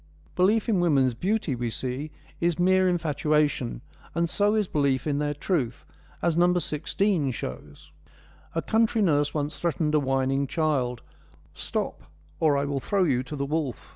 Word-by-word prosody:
Belief 210 +5 +3
in 210 -5 +2
women's 140 -7 +3
beauty, 185 - -1
we 120 -1 -2
see, 130 +6 -4 0.3
is 170 -2 +1
mere 185 +1 +4
infatua 150 -2 +2
tion, 120 -4 -5 0.3
and 170 0 +1
so 205 +5 +1
is 210 -3 +1
belief 140 -5 +1
in 145 -2 0
their 145 0 -1
truth, 145 -7 -2 0.4
as 170 -1 +2
No. 175 +1 +4
16 170 0 0
shows: 70 - -7 0.6
A - - 0
country 225 0 +2
nurse 145 -5 +2
once 150 0 -2
threatened 160 -2 0
a 155 - +5
whining 135 0 0
child: 135 -5 0 0.3
' - - -29
Stop, - - -2 0.4
or 150 -3 +3
I 140 - 0
will 140 -1 -1
throw 195 +7 +1
you 135 -7 +2
to 130 +3 -7
the 140 -1 -2
wolf.' 145 -4 -3
150 Hz, 170 wpm, -26 LUFS, 135-175 Hz, 0.6 s, a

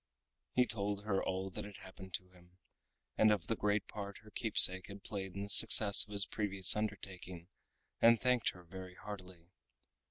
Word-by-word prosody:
He 125 - +1
told 105 -2 -6
her 100 -3 -3
all 95 +1 -6
that - - -8
had 105 -2 -13
happened 95 0 -11
to 90 -1 -11
him, 90 0 -24 0.6
and 110 0 +3
of 105 -5 -3
the 115 - -4
great 105 -1 -3
part 100 -2 -10
her 105 - -18
keepsake 95 -5 +6
had 100 -1 -14
played 95 -2 -9
in 100 - -7
the 100 - -10
success 100 0 +6
of 105 - -20
his 100 -1 -1
previous 100 -3 +1
undertaking, 95 -4 -8 0.5
and 115 0 +3
thanked 125 -3 -1
her 90 - -14
very 90 +1 -13
heartily. 90 -4 -13
100 Hz, 180 wpm, -32 LUFS, 95-105 Hz, 0.6 s, keepsake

